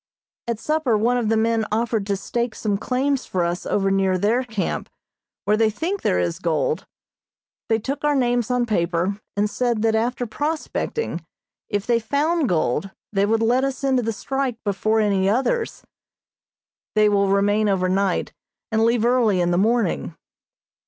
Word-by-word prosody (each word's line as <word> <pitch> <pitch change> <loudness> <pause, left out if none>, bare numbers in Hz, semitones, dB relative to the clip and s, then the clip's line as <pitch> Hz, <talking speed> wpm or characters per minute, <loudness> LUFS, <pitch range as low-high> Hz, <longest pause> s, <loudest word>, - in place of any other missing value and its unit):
At 235 -2 -1
supper 300 -3 +1
one 240 +4 +2
of 225 -3 -1
the 225 - +2
men 225 0 +2
offered 225 -2 0
to 200 -1 0
stake 235 +3 -2
some 210 -2 -1
claims 260 +5 -1
for 180 -2 0
us 175 +1 -3
over 195 -1 +1
near 190 -1 +2
their 215 +7 +2
camp, 220 -6 -3 0.6
where 210 - +3
they 220 0 +3
think 345 - -3
there - - +1
is 85 -1 -1
gold. 160 +1 -1 0.8
They 225 - +3
took 270 +6 -4
our 295 -1 +2
names 245 -3 +1
on 250 -1 +1
paper, 180 -1 0 0.2
and 205 +1 +2
said 235 0 -1
that 225 -1 +3
after 240 +3 0
prospecting, 305 - -3 0.5
if 205 -1 -1
they 235 -1 +2
found 290 +5 0
gold, 160 +1 0 0.2
they 200 0 +2
would 225 +1 +2
let 245 +3 +3
us 275 +1 -2
into 265 -2 +2
the 225 -1 -1
strike 265 +3 -2
before 215 +2 +1
any 195 -3 +2
others. 270 - 0 1.1
They 215 0 +5
will 200 -1 +3
remain 205 +2 +2
over 185 -2 +1
night, 190 0 0 0.4
and 220 0 +2
leave 230 0 +2
early 235 -6 +3
in 175 0 +1
the 175 - +2
morning. 215 -6 +1
220 Hz, 170 wpm, -22 LUFS, 200-245 Hz, 1.1 s, They